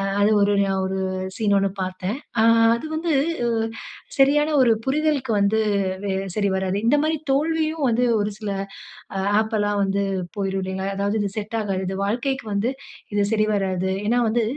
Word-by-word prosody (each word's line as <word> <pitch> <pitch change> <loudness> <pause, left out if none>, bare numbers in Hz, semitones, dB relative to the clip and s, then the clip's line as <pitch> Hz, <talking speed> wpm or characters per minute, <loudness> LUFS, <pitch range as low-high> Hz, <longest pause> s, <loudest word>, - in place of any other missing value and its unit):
அ - - -1 0.2
அது 205 +1 +4
ஒரு 205 - +3
ஞா 195 - 0
ஒரு 190 0 -2 0.4
சீன் 205 -2 +2
ஒண்ணு 195 0 +1
பார்த்தேன். 185 +6 -3 0.2
ஆ - - +5 0.3
அது 235 - -6
வந்து 330 +1 -2 0.4
அ - - +1 0.7
சரியான 295 +3 +4
ஒரு 235 - +5
புரிதலுக்கு 280 -3 +1
வந்து 200 +2 +2 0.5
வெ 190 - 0 0.2
சரி 205 -1 +1
வராது. 190 0 -1
இந்த 270 - +5
மாரி 315 +1 +1
தோல்வியும் 315 +1 +1
வந்து 240 +1 +2 0.2
ஒரு 205 +1 0
சில 210 -2 -4 0.9
ஆப்பெலாம் 205 -2 0
வந்து 195 +1 0 0.3
போய்ரும் 195 -1 -2
இல்லைங்களா? 190 +1 -3
அதாவது 200 +2 0
இது 205 - 0
செட் 215 +1 -3
ஆகாது. 195 -3 -2
இது 190 - -3
வாழ்க்கைக்கு 245 +6 -1
வந்து, 200 +5 0 0.4
இது 205 0 +2
சரிவராது. 195 -4 0
ஏன்னா 240 +3 +2
வந்து 230 +1 +1
210 Hz, 165 wpm, -23 LUFS, 195-250 Hz, 0.9 s, ஆ